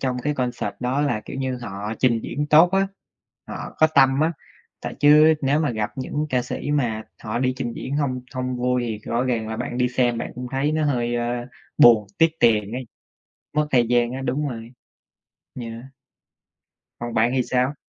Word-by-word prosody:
trong 130 -2 -1
cái 150 0 0
concert 125 -5 -2
đó 125 +3 0
là, 140 -7 0
kiểu - - -7
như, 130 -1 -2
họ 105 0 -5
trình 120 -3 +2
diễn 145 +3 -3
tốt 160 +4 +6
á, 195 0 +3 0.6
họ - - -7
có 155 - +6
tâm 135 -2 +4
á, 160 +2 +2 0.5
tại - - -5
chứ 150 +2 +7
nếu 140 +3 +2
mà 150 - +1
gặp 110 -2 -2
những 145 +3 -3
ca 125 -1 +1
sĩ 125 - -4
mà 120 -7 0 0.2
họ 110 +2 -2
đi 130 0 +1
trình 120 -3 -3
diễn 135 +4 -4
hông 130 -4 -1
hông 130 0 -2
vui 125 0 0
thì 110 -2 -3
rõ 120 +2 +1
ràng 115 -4 -1
là 110 - -4
bạn 125 +1 -4
đi 125 0 +2
xem 120 -2 +1
bạn - - -5
cũng 125 +1 -6
thấy 140 +3 0
nó 155 0 +1
hơi, 120 -4 0
ơ, 120 0 -2 0.3
buồn, 110 -4 +7
tiếc 165 0 +5
tiền 105 -3 +3
ấy, 125 0 -5 0.7
mất 150 0 +2
thời 120 -4 +3
gian 120 0 +2
á, 130 - -4
đúng 145 +4 -1
rồi. 115 -2 -8 0.9
Yeah. 115 0 -7 1.1
Còn 120 0 -5
bạn 115 +2 +3
thì 130 - +2
sao? 130 +3 0
125 Hz, 200 wpm, -23 LUFS, 120-140 Hz, 1.1 s, chứ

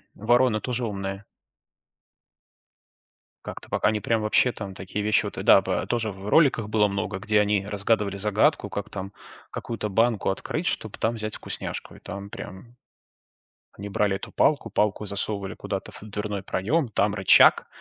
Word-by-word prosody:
вороны 120 0 +3
тоже 125 -1 -2
умные. 100 -1 -4 2.2
Как-то, - - -8
пока - - +1
они 105 0 0
прям, 115 +1 0
вообще, 105 +4 +3
там 100 -4 -7
такие 95 +2 -4
вещи 105 -1 +3
вот, - - -5
да, - - +8
ба - - -2
тоже 115 -2 -1
в 100 +1 -8
роликах 120 -5 +4
было 105 -1 +3
много, 100 -1 -3
где 105 +1 +2
они 105 -1 +1
разгадывали 105 0 0
загадку, 105 +1 +2
как 100 +1 -5
там 95 0 -6 0.4
какую-то 110 -2 -4
банку 110 0 +2
открыть, 155 - -3
чтоб 110 - -2
там 115 +1 0
взять 110 -1 -4
вкусняшку. - - -5
И - - -15
там 100 0 -7
прям 115 +7 -10 1.0
они 100 +1 -8
брали 100 0 +1
эту - - -7
палку, 145 -1 +2
палку 105 0 0
засовывали 100 -1 -3
куда-то - - -5
в - - -10
дверной 105 -1 -4
проём. 120 - 0
Там 100 -1 +1
рычаг, 95 -2 +6
105 Hz, 160 wpm, -25 LUFS, 100-110 Hz, 2.2 s, да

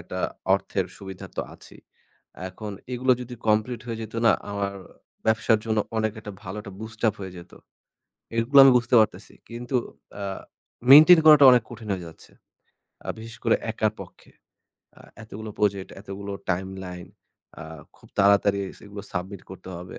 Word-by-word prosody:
একটা - - -7 0.4
অর্থের - - -2
সুবিধা 95 -1 -9
তো - - 0
আছেই। - - -16 0.7
এখন 105 +3 -8 0.2
এগুলো 130 +1 +2
যদি 125 0 -7
complete 110 +3 +1
হয়ে 115 -1 -4
যেত 110 +1 -9
না - - +7 0.2
আমার 100 -1 -2 0.5
ব্যবসার 110 0 +3
জন্য 110 -1 0 0.2
অনেক 110 -1 0
একটা 105 -1 -8
ভালো 95 +1 -7
একটা 100 -2 -10
boost 110 0 -9
up 105 - +2
হয়ে 95 -1 -7
যেত। 85 0 -12 0.9
এগুলো 125 +5 +2
আমি 135 - +8
বুঝতে 120 +1 +1
পারতেছি 100 -2 -1 0.2
কিন্তু 120 +3 -5 0.5
আ - - -3 0.7
maintain 155 +5 +10
করাটা 150 -3 +9
অনেক 125 -2 +4
কঠিন 115 -2 -10
হয়ে 90 -2 -6
যাচ্ছে। 80 - -15 0.8
আ - - -8
বিশেষ 115 +1 -9
করে - - +4 0.2
একার 110 -1 0
পক্ষে। - - -13 0.7
আ - - -21 0.2
এতগুলো 110 0 -8
project, 100 -2 0
এতগুলো 100 0 -7 0.2
timeline, 90 -1 -5 0.5
আ - - -6 0.3
খুব - - -20
তাড়াতাড়ি 100 0 +4 0.2
সেগুলো 100 0 -10
submit 95 +1 -5
করতে 95 0 -10
হবে। 90 +1 -10
105 Hz, 155 wpm, -25 LUFS, 95-115 Hz, 0.9 s, maintain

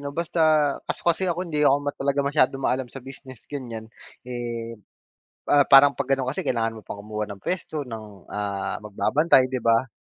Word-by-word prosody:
no 140 0 -5
basta 170 0 -2 0.5
kaso - - -3
kasi 170 +2 +2
ako 175 +2 -1
hindi 150 -2 -1
ako 140 -1 +5
ma 145 - -1
talagang 140 0 -1
masyadong 135 -2 +2
maalam 130 -1 0
sa 135 - -9
business 135 -2 -12
ganyan. 120 -6 -6 0.4
Eh, 120 -2 -5 0.8
ah, 145 -1 +5
parang 140 +1 +7
pag 140 - -3
ganon 135 -1 +1
kasi 130 - -2
kailangan 115 -2 -1
mo 110 - -10
pang 100 - -8
kumuha 105 +1 -4
ng 100 - -9
puwesto, 155 - -3
ng 105 -5 -10
ah, 100 -1 -3
magbabantay 130 +6 +3
di 130 0 -3
ba? 115 +2 +3
130 Hz, 185 wpm, -24 LUFS, 115-145 Hz, 0.8 s, parang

